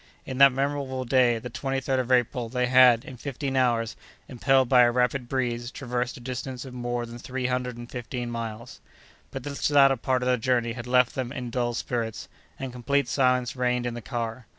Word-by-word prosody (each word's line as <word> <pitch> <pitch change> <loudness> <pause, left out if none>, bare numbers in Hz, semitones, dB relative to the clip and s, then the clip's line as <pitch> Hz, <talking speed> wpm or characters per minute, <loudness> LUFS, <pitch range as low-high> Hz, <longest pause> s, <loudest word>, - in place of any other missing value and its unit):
In 130 0 -5
that 140 0 +9
memorable 135 -1 -2
day, 125 -2 +3
the 115 +2 -7
23d 135 0 -1
of 130 0 -2
April, 125 -1 +1
they 125 +1 0
had, 125 -1 +6
in 130 -5 -9
fifteen 135 +1 -4
hours, 120 -3 +1 0.3
impelled 130 +1 +2
by 125 0 +6
a 120 - +6
rapid 125 0 0
breeze, 120 -2 -2
traversed 125 -2 -3
a - - -10
distance 130 +1 -5
of 130 - -9
more 120 -1 -3
than 120 0 -10
three 130 +1 -4
hundred 125 -1 -2
and 120 0 -8
fifteen 120 0 -5
miles. 115 0 -6 0.5
But 135 - -7
this 140 +1 -2
latter 135 -2 +5
part 125 +1 0
of - - -1
the 125 -1 +2
journey 120 -1 +1
had 120 0 -7
left 125 -1 +3
them 130 -2 -3
in 125 -4 -5
dull 120 -1 -1
spirits, 115 -2 -3 0.3
and 130 -2 -6
complete 140 +3 0
silence 125 -2 +1
reigned 125 -1 0
in 120 - -2
the 120 - -6
car. 115 -1 -5
125 Hz, 200 wpm, -26 LUFS, 120-130 Hz, 0.5 s, that